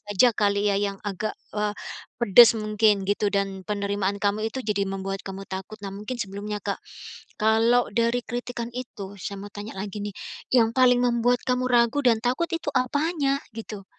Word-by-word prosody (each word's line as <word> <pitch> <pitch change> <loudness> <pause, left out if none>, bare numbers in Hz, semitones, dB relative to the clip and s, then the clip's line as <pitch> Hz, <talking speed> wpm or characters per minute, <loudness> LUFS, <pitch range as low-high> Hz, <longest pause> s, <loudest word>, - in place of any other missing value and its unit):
saja 230 +5 +5
kali 205 0 +1
ya 200 - +3
yang 200 0 -1
agak, 205 +2 -3 0.2
eee, 210 0 0 0.5
pedes 235 +1 +7
mungkin 215 -1 +2
gitu 205 +1 +1
dan 195 -1 -1
penerimaan 200 0 -1
kamu 205 +2 0
itu 260 - -5
jadi 205 -1 0
membuat 195 0 -4
kamu 195 0 -7
takut. 190 +3 -7
Nah 195 - -6
mungkin 210 +5 -6
sebelumnya, 205 0 -4
Kak, 200 - -3 0.6
kalau 225 +3 +4
dari 235 +1 +1
kritikan 240 -1 -4
itu, 215 -6 -7
saya 200 - -5
mau 200 +1 -9
tanya 205 -1 -7
lagi 205 +1 -5
nih, 205 -1 -5 0.4
yang 230 -2 +4
paling 255 -1 +5
membuat 245 0 +2
kamu 250 0 +1
ragu 240 +3 +3
dan 240 -4 +4
takut 250 +9 -1
itu 330 -3 -3
apanya 280 +2 +1 0.2
gitu? 215 -3 -7
215 Hz, 170 wpm, -25 LUFS, 200-245 Hz, 0.6 s, pedes